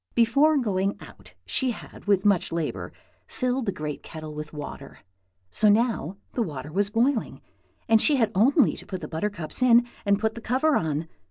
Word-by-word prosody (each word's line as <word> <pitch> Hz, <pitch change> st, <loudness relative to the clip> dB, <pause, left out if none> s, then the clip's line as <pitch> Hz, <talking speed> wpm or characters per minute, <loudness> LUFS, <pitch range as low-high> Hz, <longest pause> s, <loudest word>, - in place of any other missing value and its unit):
Before 275 Hz, +7 st, +4 dB
going 200 Hz, -6 st, 0 dB
out -, -, -15 dB
she 260 Hz, -, 0 dB
had 240 Hz, -, -8 dB
with 200 Hz, -1 st, +2 dB
much 200 Hz, -4 st, +2 dB
labor 165 Hz, -2 st, -3 dB, 0.4 s
filled 250 Hz, -1 st, -2 dB
the -, -, +2 dB
great 150 Hz, -4 st, -5 dB
kettle 155 Hz, -1 st, -8 dB
with 150 Hz, 0 st, -7 dB
water, 145 Hz, -2 st, -9 dB, 0.5 s
so 215 Hz, -, +4 dB
now 205 Hz, -, +1 dB, 0.2 s
the 245 Hz, -, -1 dB
water 150 Hz, -, -4 dB
was 200 Hz, +4 st, 0 dB
boiling, 235 Hz, +3 st, 0 dB, 0.5 s
and 225 Hz, -1 st, +5 dB
she 300 Hz, -, +4 dB
had 225 Hz, -5 st, +2 dB
only 260 Hz, -, +4 dB
to -, -, -10 dB
put 185 Hz, -2 st, -5 dB
the -, -, -5 dB
buttercups 170 Hz, +2 st, -2 dB
in 240 Hz, -1 st, +6 dB, 0.2 s
and 200 Hz, -1 st, +3 dB
put 220 Hz, 0 st, 0 dB
the 230 Hz, -, -9 dB
cover 270 Hz, +7 st, +1 dB
on. 160 Hz, 0 st, -1 dB
210 Hz, 180 wpm, -25 LUFS, 165-240 Hz, 0.5 s, in